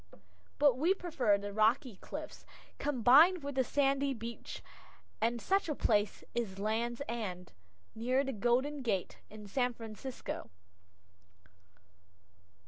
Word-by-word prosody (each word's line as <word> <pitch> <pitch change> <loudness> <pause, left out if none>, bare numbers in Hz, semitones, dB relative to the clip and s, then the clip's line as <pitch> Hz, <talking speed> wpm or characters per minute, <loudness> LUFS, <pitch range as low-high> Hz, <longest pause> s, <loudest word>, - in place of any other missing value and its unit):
But 280 -4 +4
we 350 +6 +3
prefer 280 - +1
the 200 0 -6
rocky 220 +1 +2
cliffs, - - -8 0.4
combined 290 - +5
with 285 0 -4
the 260 0 +2
sandy 275 0 +1
beach, 230 +1 -7 0.6
and 235 +2 +1
such 390 - +1
a 300 - -1
place 210 -4 +1
is 225 -5 -3
Land's 230 +5 -1
End, 185 -7 -4 0.4
near 250 +4 +1
the 270 -1 -3
Golden 250 +6 +1
Gate, 195 -8 -2
in 210 -1 -10
San 245 +4 0
Francisco. 225 - -7
240 Hz, 120 wpm, -33 LUFS, 215-275 Hz, 0.6 s, combined